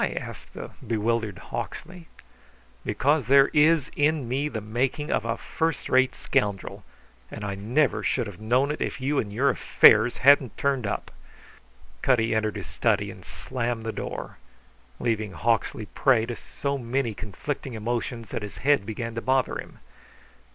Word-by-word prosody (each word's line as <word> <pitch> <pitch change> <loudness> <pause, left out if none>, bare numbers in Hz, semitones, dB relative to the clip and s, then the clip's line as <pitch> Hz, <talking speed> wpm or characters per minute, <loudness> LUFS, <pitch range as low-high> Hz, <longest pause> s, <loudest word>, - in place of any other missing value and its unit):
asked - - -4
the - - -7 0.2
bewildered 110 -2 0
Hawksley. 175 +1 -7 0.8
"Because 135 +5 +1
there 135 +1 +6
is 155 -1 +3
in 150 -3 +1
me 135 +5 -1
the 115 - -4
making 125 +7 -2
of - - 0
a 115 0 -1
first 160 -2 -2
rate 130 0 +3
scoundrel, 100 -2 -1 0.5
and 105 - -6
I 100 - -2
never 110 +3 +1
should 120 +3 0
have 100 -3 -9
known 125 +6 +2
it 150 - -5
if - - -2
you 140 +2 0
and 105 - -3
your 130 +7 +2
affairs - - +5
hadn't 140 -2 +5
turned 135 -5 0
up." 100 - -4 0.9
Cutty 115 -3 +2
entered 110 -2 0
his - - -5
study - - 0
and - - -13
slammed 120 -2 -3
the 115 - -2
door, - - -6 0.6
leaving 110 -4 -1
Hawksley 110 +3 0
prey 120 0 +2
to 120 0 -4
so 140 +3 -4
many 120 -1 -1
conflicting 120 +5 -5
emotions 115 0 -3
that - - -4
his 105 -1 -7
head 140 -8 +3
began 115 +1 -4
to 115 - -4
bother 130 +1 +1
him. - - -9
120 Hz, 160 wpm, -26 LUFS, 110-140 Hz, 0.9 s, there